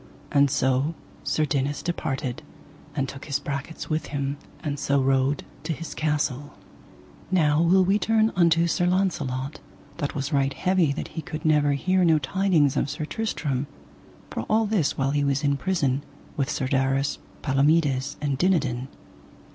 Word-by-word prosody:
And 140 Hz, 0 st, +4 dB
so 135 Hz, +3 st, +1 dB, 0.3 s
Sir 155 Hz, -, +1 dB
Dinas 140 Hz, 0 st, -1 dB
departed, 135 Hz, -5 st, -3 dB, 0.5 s
and 135 Hz, -3 st, 0 dB
took 135 Hz, +1 st, -8 dB
his 140 Hz, -2 st, 0 dB
brachets 140 Hz, +2 st, -5 dB
with 155 Hz, 0 st, -1 dB
him, 140 Hz, 0 st, -2 dB, 0.3 s
and 145 Hz, -3 st, -2 dB
so 140 Hz, 0 st, +2 dB
rode 135 Hz, +1 st, +2 dB, 0.2 s
to 165 Hz, -, -2 dB
his 160 Hz, 0 st, -7 dB
castle. 145 Hz, -2 st, -1 dB, 0.7 s
Now 155 Hz, -4 st, +3 dB
will 185 Hz, +2 st, +5 dB
we 195 Hz, +3 st, +3 dB
turn 225 Hz, 0 st, +3 dB
unto 170 Hz, -1 st, +4 dB
Sir 175 Hz, +1 st, +1 dB
Launcelot, 150 Hz, -7 st, -1 dB, 0.4 s
that 145 Hz, -4 st, -3 dB
was 140 Hz, +1 st, -3 dB
right 135 Hz, -1 st, +1 dB
heavy 185 Hz, -5 st, +2 dB
that -, -, -5 dB
he 160 Hz, -, -5 dB
could 155 Hz, +1 st, -7 dB
never 150 Hz, -2 st, +4 dB
hear 185 Hz, +6 st, +2 dB
no 165 Hz, -2 st, +5 dB
tidings 170 Hz, -4 st, +2 dB
of 140 Hz, -, 0 dB
Sir 155 Hz, +2 st, -3 dB
Tristram, 145 Hz, -, -2 dB, 0.6 s
for -, -, -3 dB
all 220 Hz, +1 st, +3 dB
this 205 Hz, -8 st, +1 dB
while 135 Hz, 0 st, +1 dB
he 145 Hz, 0 st, +1 dB
was 140 Hz, 0 st, +1 dB
in 140 Hz, -1 st, +2 dB
prison 140 Hz, -3 st, 0 dB, 0.3 s
with 140 Hz, -4 st, -1 dB
Sir 130 Hz, -, -1 dB
Darras, 135 Hz, +1 st, +1 dB, 0.2 s
Palomides, 140 Hz, -1 st, +2 dB
and 140 Hz, -2 st, -1 dB
Dinadan. 140 Hz, -9 st, +1 dB
145 Hz, 160 wpm, -25 LUFS, 135-165 Hz, 0.7 s, will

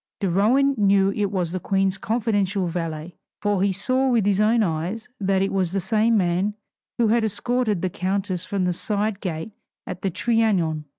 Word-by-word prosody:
De 195 Hz, -, 0 dB
Rohan 235 Hz, +10 st, +3 dB
knew 195 Hz, -1 st, +4 dB
it 205 Hz, 0 st, -1 dB
was 180 Hz, -4 st, -2 dB
the 185 Hz, -, -3 dB
Queen's 195 Hz, +1 st, 0 dB
confidential 205 Hz, -4 st, 0 dB
valet, 165 Hz, -1 st, -4 dB, 0.2 s
for 205 Hz, -2 st, 0 dB
he 200 Hz, 0 st, +2 dB
saw 255 Hz, +8 st, 0 dB
with 230 Hz, -5 st, +2 dB
his 200 Hz, 0 st, +2 dB
own 225 Hz, +2 st, +3 dB
eyes 180 Hz, +6 st, -3 dB
that 195 Hz, -1 st, +1 dB
it 195 Hz, -, -2 dB
was 185 Hz, -2 st, 0 dB
the 195 Hz, -, +1 dB
same 220 Hz, +3 st, +2 dB
man 185 Hz, +2 st, 0 dB, 0.4 s
who 235 Hz, -3 st, +2 dB
had 230 Hz, +1 st, +3 dB
escorted 220 Hz, -1 st, 0 dB
the 185 Hz, -, +1 dB
countess 185 Hz, 0 st, -2 dB
from 190 Hz, -1 st, -2 dB
the 180 Hz, -, +1 dB
side 205 Hz, +2 st, -1 dB
gate 165 Hz, +1 st, -4 dB, 0.3 s
at 180 Hz, -1 st, -7 dB
the 195 Hz, -, 0 dB
Trianon! 185 Hz, -8 st, +1 dB
195 Hz, 185 wpm, -23 LUFS, 185-215 Hz, 0.4 s, knew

